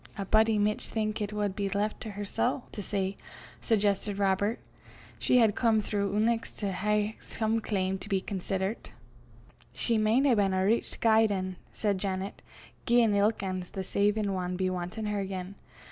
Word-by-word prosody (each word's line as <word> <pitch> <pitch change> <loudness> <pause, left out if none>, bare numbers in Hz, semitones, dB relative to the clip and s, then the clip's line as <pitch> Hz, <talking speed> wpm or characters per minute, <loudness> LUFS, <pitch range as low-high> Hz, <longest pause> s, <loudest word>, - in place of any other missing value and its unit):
"A 200 - -3
body 220 +2 +4
micht 210 0 +1
think 215 -1 -2
it 205 0 -2
wad 205 -2 -1
be 200 -2 -1
left 205 +2 -1
to 220 - -5
hersel' 205 +5 -1
to 210 - -5
say," 195 0 -2 0.4
suggested 205 -2 +1
Robert. 200 +3 +1 0.6
"She 250 - +3
had 225 -4 +5
come 225 -1 +3
throu' 200 -1 -1
eneuch 225 +2 +1
to 200 -2 -2
hae 210 +3 0
some 225 0 -1
claim 190 -3 -1
to 205 - -9
be 195 -2 +2
considert." 190 +2 -3 0.8
"She 230 -2 0
maun 220 +6 +3
hae 270 - +5
been 200 -3 +2
a 185 0 +2
richt 225 +4 0
guid 220 -1 +5
ane," 185 -2 -2
said 205 -3 -1
Janet, 190 0 -3 0.5
"gien 235 -3 +4
ilk 205 +1 +2
ane 185 -1 -2
o' - - -8
the 190 - -3
saiven 205 +1 +1
wad 180 -1 -2
be 185 0 0
wantin' 185 +5 -4
her 210 -1 -1
again. 190 -1 -4
205 Hz, 175 wpm, -29 LUFS, 190-220 Hz, 0.8 s, had